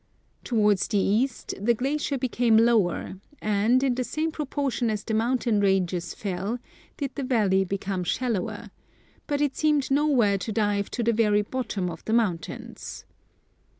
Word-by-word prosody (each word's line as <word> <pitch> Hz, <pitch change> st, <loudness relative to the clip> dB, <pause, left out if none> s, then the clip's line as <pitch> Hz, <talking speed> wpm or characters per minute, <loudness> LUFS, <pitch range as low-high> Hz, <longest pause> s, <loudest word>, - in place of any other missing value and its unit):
Towards 210 Hz, -5 st, +2 dB
the 210 Hz, -, 0 dB
east 225 Hz, +6 st, 0 dB
the 235 Hz, +2 st, +3 dB
glacier 280 Hz, +3 st, -1 dB
became 240 Hz, -3 st, +2 dB
lower, 220 Hz, -5 st, +2 dB, 0.2 s
and 215 Hz, +5 st, +2 dB
in 265 Hz, -2 st, +2 dB
the 255 Hz, +1 st, -1 dB
same 310 Hz, +5 st, -2 dB
proportion 280 Hz, -5 st, -1 dB
as 215 Hz, -1 st, -2 dB
the 220 Hz, -, -3 dB
mountain 230 Hz, -1 st, +1 dB
ranges 185 Hz, -3 st, 0 dB
fell, 200 Hz, +3 st, -3 dB, 0.4 s
did 280 Hz, -3 st, -3 dB
the 285 Hz, -, -4 dB
valley 210 Hz, -7 st, +2 dB
become 190 Hz, -1 st, -3 dB
shallower; 220 Hz, +1 st, -2 dB, 0.6 s
but 290 Hz, 0 st, -1 dB
it 290 Hz, -2 st, +1 dB
seemed 300 Hz, -3 st, +1 dB
nowhere 265 Hz, -9 st, +3 dB
to 220 Hz, -, -4 dB
dive 205 Hz, -2 st, 0 dB
to 240 Hz, -, -2 dB
the 235 Hz, +1 st, +2 dB
very 210 Hz, -2 st, +3 dB
bottom 215 Hz, -5 st, -3 dB
of 160 Hz, -, -10 dB
the 220 Hz, -, -1 dB
mountains. 195 Hz, -9 st, -2 dB
225 Hz, 150 wpm, -26 LUFS, 200-255 Hz, 0.6 s, the